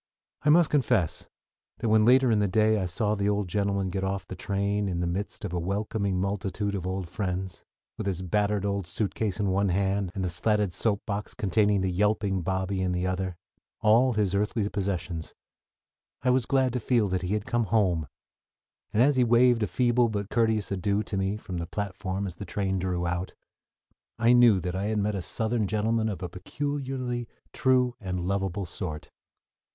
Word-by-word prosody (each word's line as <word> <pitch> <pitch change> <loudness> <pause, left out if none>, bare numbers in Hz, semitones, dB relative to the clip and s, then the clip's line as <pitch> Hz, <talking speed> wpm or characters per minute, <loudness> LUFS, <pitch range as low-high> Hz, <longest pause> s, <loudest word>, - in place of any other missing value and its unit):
_" - - -2
I - - +6
must 165 +1 +5
confess 125 - +1 0.5
that 115 - -2
when 110 0 +5
later 130 +1 +5
in 110 - +3
the 105 - +2
day 110 +2 +3
I 90 - -1
saw 105 +4 0
the 100 -1 0
old 100 -1 0
gentleman 100 0 0
get 95 +1 -2
off 95 0 -2
the 95 - -7
train 100 +1 -1
in 85 -2 -2
the 90 - 0
midst 100 +4 -3
of 90 - -5
a 90 - 0
welcoming 100 +1 -1
multitude 100 +1 -2
of 95 -2 -3
old 95 -1 -3
friends, 95 0 -4 0.4
with - - -3
his 95 -1 -2
battered 105 +2 0
old 100 -3 -1
suitcase 105 0 -2
in 100 -2 +1
one 100 +1 +2
hand, 95 0 0
and 95 -2 -1
the - - -1
slatted 105 +2 +1
soap 105 0 0
box 105 -1 -4
containing 105 0 +2
the 95 -1 0
yelping 100 0 +1
Bobby 95 +2 -1
in 90 -1 0
the 90 +1 -1
other 95 0 -2 0.5
all 120 +4 +5
his 105 -4 0
earthly 105 +1 0
possessions 90 -5 -3 0.9
I 125 - +3
was 125 -1 +2
glad 130 -3 +2
to 125 - 0
feel 115 -2 +2
that 95 0 -1
he 95 +3 -1
had 105 -1 -3
come 120 -1 0
"home"; 90 -7 +1 0.8
and 110 - +4
as 140 0 +3
he 125 - +5
waved 120 0 +4
a 105 - +1
feeble 120 +5 +2
but 100 -2 -4
courteous 110 -4 +1
adieu 100 +2 0
to 105 - -5
me 95 +2 0
from 95 -4 -6
the 85 - -4
platform 100 0 -3
as 90 -3 -6
the 100 - -6
train 95 0 -1
drew 90 -1 -1
out 90 +1 -3 0.8
I 115 +1 +4
knew 120 -5 +6
that 90 +1 -3
I 95 +2 -1
had 110 +1 0
met 105 +1 0
a 100 - -2
Southern 110 +4 -1
gentleman 110 +2 0
of 95 -3 -5
a - - -2
peculiarly 130 +4 -4 0.3
true 125 -1 +3
and 90 -2 -3
lovable 95 0 -1
sort. 85 -3 -6
100 Hz, 200 wpm, -27 LUFS, 95-110 Hz, 0.9 s, I